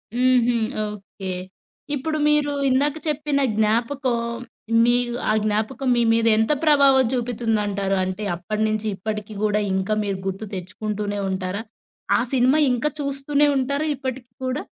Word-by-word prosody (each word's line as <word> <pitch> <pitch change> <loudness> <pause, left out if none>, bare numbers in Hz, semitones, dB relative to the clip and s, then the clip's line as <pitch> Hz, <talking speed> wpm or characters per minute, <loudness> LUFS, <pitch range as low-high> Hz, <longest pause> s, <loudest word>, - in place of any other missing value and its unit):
హుహు. 245 -1 +3 0.3
ఓకే. 195 -2 -7 0.6
ఇప్పుడు 310 +3 -2
మీరు 300 -1 +3 0.2
ఇందాక 285 +3 +2
చెప్పిన 295 -1 0 0.2
జ్ఞాపకం, 235 +4 +1 0.7
మీ 240 0 +4 0.3
ఆ - - +4
జ్ఞాపకం 220 +6 -1
మీ - - +3
మీద 230 0 +2
ఎంత 220 +5 +2
ప్రభావం 280 -4 +5
చూపితుందంటారు? 215 -5 -1
అంటే, 185 +3 -4
అప్పటి 210 +5 -4
నుంచి 215 0 -2
ఇప్పటికి 210 +2 -5
కూడా 210 0 +2
ఇంకా 190 +2 0
మీరు 200 -2 -2
గుర్తు 195 +3 -4
తెచ్చుకుంటూనే 205 +2 -4
ఉంటారా? 190 +2 -3 0.6
ఆ - - +1
సినిమా 260 +3 +4
ఇంకా 250 +4 0
చూస్తూనే 280 +1 +1
ఉంటారా! 280 +3 -1
ఇప్పటికి 260 -2 -6 0.2
కూడా? 255 +3 -1
235 Hz, 130 wpm, -22 LUFS, 210-270 Hz, 0.7 s, ప్రభావం